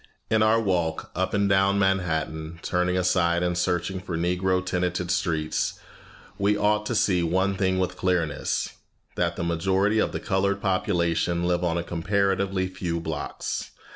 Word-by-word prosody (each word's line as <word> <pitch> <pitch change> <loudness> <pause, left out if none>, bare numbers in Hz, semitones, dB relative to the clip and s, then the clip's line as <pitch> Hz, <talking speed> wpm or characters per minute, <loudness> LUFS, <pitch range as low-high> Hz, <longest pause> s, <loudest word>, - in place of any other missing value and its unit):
In 110 -1 +4
our 110 +1 +4
walk 90 -6 -1
up 95 +2 -1
and 100 -1 +2
down 100 0 +3
Manhattan, 85 -4 0
turning 90 0 0
aside 90 -1 +2
and 90 0 0
searching 90 +1 -1
for 90 -3 -4
Negro 90 +2 0
tenanted 90 -1 -1
streets, 80 -5 -1 0.6
we 100 +1 +2
ought 105 +1 +1
to 120 - -1
see 100 -4 +3
one 95 +4 +1
thing 95 -1 +1
with 90 -1 -1
clearness 85 -5 0 0.4
that - - 0
the - - -3
majority 95 +5 +1
of - - +1
the - - -3
colored 100 -1 0
population 85 -3 0
live 90 0 +1
on 85 -1 +1
a 85 - -1
comparatively 95 +2 0
few 90 -2 -3
blocks. 80 -3 -4
90 Hz, 155 wpm, -25 LUFS, 85-95 Hz, 0.6 s, In